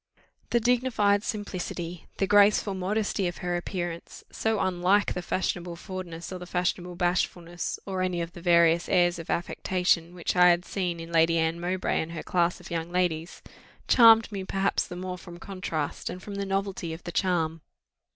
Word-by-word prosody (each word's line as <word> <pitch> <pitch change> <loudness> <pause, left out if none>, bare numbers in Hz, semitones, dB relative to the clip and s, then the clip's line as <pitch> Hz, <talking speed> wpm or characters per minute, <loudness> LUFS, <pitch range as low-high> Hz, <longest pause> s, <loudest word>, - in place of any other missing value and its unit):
The 235 - +3
dignified 230 -4 +2
simplicity, 180 -6 -5
the 195 - +2
graceful 205 0 +4
modesty 195 +1 -1
of 175 - -5
her 175 0 0
appearance, 175 -1 -5
so 220 -1 0
unlike 185 +3 +2
the 180 - -3
fashionable 175 -1 -2
forwardness 175 -1 -7
or 185 - -6
the 180 - -9
fashionable 180 0 -1
bashfulness, 175 -1 -1
or 190 -2 -3
any 180 -1 0
of 170 0 -3
the 175 - -10
various 170 -1 +4
airs 175 -2 +3
of 165 - -9
affectation, 175 -1 0
which 175 - -2
I 180 0 +7
had 175 0 +2
seen 180 -4 -2
in 165 0 -8
Lady 165 0 +4
Anne 165 +1 0
Mowbray 180 +2 -1
and 165 +1 -6
her 165 - -5
class 175 -1 +1
of - - -12
young 165 0 -3
ladies, 175 -2 -1 0.4
charmed 225 -2 +7
me 195 -2 -4
perhaps 195 +1 0
the 180 - -7
more 180 0 -5
from 175 -1 -11
contrast 175 -5 -4
and 180 - -6
from 205 +2 -8
the 200 0 -3
novelty 195 -4 -2
of 165 - -9
the 175 - -5
charm. 165 -4 0
180 Hz, 180 wpm, -27 LUFS, 170-195 Hz, 0.4 s, I